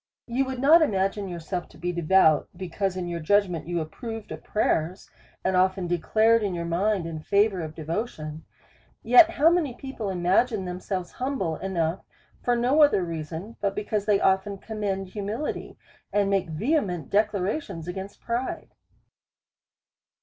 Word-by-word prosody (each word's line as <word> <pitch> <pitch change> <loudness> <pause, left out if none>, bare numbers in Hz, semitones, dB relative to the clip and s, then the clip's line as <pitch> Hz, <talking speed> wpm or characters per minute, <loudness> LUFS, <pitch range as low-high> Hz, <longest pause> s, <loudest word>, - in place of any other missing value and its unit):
You 255 +3 0
would 260 0 -4
not 300 +6 +6
imagine 195 -6 0
yourself 175 +1 -5
to - - -17
be 175 +2 -2
devout, 170 -2 +3
be 185 -1 -6
cause 190 +1 -1
in 180 -1 -3
your 170 -1 -3
judgment 180 -1 +1
you 175 0 -1
approved 225 +7 -6
of - - -7
prayers, 180 -3 -1 0.3
and 190 - +2
often 185 0 +2
declared 220 +7 +3
your 180 -5 -2
mind 185 +2 0
in 165 -1 -5
favour 200 +2 +2
of 155 -1 -6
devotion. 160 -2 -4 0.6
Yet 250 +8 +7
how 330 -1 +4
many 315 -8 0
people 260 -7 -5
imagine 190 +4 +1
themselves 180 0 -4
humble 250 - -2
enough 175 -2 -2 0.4
for 245 - +1
no 250 +6 +3
other 285 -11 +5
reason, 165 +5 -6
but 200 -1 0
because 210 0 -2
they 205 -2 +4
often 190 +1 +1
commend 195 -3 -3
humihty, 210 +8 -4 0.3
and 200 -1 +2
make 195 -4 +1
vehement 180 - -1
declarations 200 - 0
against 190 +2 -6
pride 240 +2 -3
195 Hz, 150 wpm, -26 LUFS, 175-225 Hz, 0.6 s, Yet